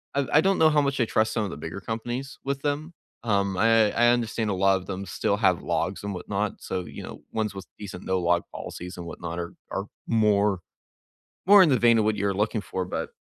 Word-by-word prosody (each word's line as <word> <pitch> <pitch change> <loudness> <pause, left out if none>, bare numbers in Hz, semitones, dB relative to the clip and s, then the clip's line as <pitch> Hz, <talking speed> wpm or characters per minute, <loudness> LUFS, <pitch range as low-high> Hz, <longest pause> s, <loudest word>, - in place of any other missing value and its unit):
I 140 -1 +1
I 155 - +7
don't 195 +1 +2
know 160 -1 +6
how 150 -1 +3
much 140 -1 -1
I 120 - +3
trust 110 0 +1
some 110 -3 0
of - - -4
the - - -7
bigger 80 +5 -6
companies 120 +5 -5
with 140 0 -2
them, 150 +3 -2 0.3
um, 100 -3 +1
I 115 -1 +4
I 120 +1 +4
understand 115 -2 0
a - - +1
lot 95 +1 +3
of 95 - -9
them 100 0 -4
still 100 +2 -1
have 95 -5 +2
logs - - -2
and 100 0 -3
whatnot, 100 +2 -3
so, 95 -1 -3
you - - -9
know, - - -9
ones 105 -3 -1
with 95 - -7
decent 95 -3 -8
no-log 85 -2 +1
policies 90 +1 -7
and 85 - -6
whatnot 85 0 -6
are 85 0 -5 0.2
are - - -2 0.2
more 105 -3 +3 0.9
more 205 -1 +9
in 165 - +3
the 130 - +3
vein 115 -1 +5
of 105 - +2
what 110 - +2
you're 100 -1 0
looking 105 +2 0
for, 95 0 -4
but, - - -4
105 Hz, 230 wpm, -26 LUFS, 95-120 Hz, 0.9 s, more